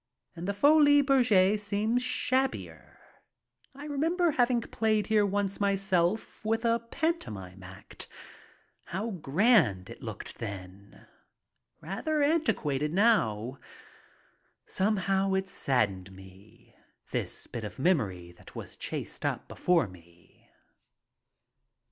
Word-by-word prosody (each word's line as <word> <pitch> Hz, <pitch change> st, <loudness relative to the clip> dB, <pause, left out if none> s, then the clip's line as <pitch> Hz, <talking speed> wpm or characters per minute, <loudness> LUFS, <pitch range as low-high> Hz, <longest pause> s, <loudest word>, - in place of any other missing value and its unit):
And 170 Hz, +2 st, -6 dB
the 200 Hz, -, 0 dB
Folies 290 Hz, +3 st, +6 dB
Bergere 215 Hz, -7 st, +4 dB
seems 210 Hz, +4 st, 0 dB
shabbier. 260 Hz, +1 st, -2 dB, 0.8 s
I 285 Hz, +2 st, -9 dB
remember 325 Hz, +4 st, +1 dB
hav 245 Hz, -3 st, +2 dB
ing 240 Hz, -2 st, +1 dB
played 220 Hz, -2 st, 0 dB
here 210 Hz, -2 st, +3 dB
once 200 Hz, 0 st, -1 dB
myself 195 Hz, 0 st, 0 dB
with 225 Hz, +2 st, 0 dB
a 230 Hz, 0 st, +3 dB
pantomime 105 Hz, -, -3 dB
act. 95 Hz, +1 st, -11 dB, 0.8 s
How 210 Hz, +6 st, -4 dB
grand 160 Hz, -, +2 dB
it -, -, -11 dB
looked -, -, -7 dB
then. 100 Hz, -2 st, -9 dB, 0.8 s
Rather 285 Hz, -, -1 dB
antiquated 150 Hz, -, +1 dB
now. 135 Hz, -, +2 dB, 1.1 s
Somehow 195 Hz, -1 st, +1 dB
it 190 Hz, 0 st, -1 dB
saddened 100 Hz, -, -1 dB
me, 95 Hz, +5 st, -16 dB, 0.4 s
this -, -, -3 dB
bit 115 Hz, -, -7 dB
of 105 Hz, -, -7 dB
memory 105 Hz, -, 0 dB
that 85 Hz, -, -17 dB
was -, -, -8 dB
chased -, -, -6 dB
up -, -, -2 dB
before 175 Hz, -, +1 dB
me. 85 Hz, -2 st, -19 dB
195 Hz, 110 wpm, -29 LUFS, -, 1.1 s, Folies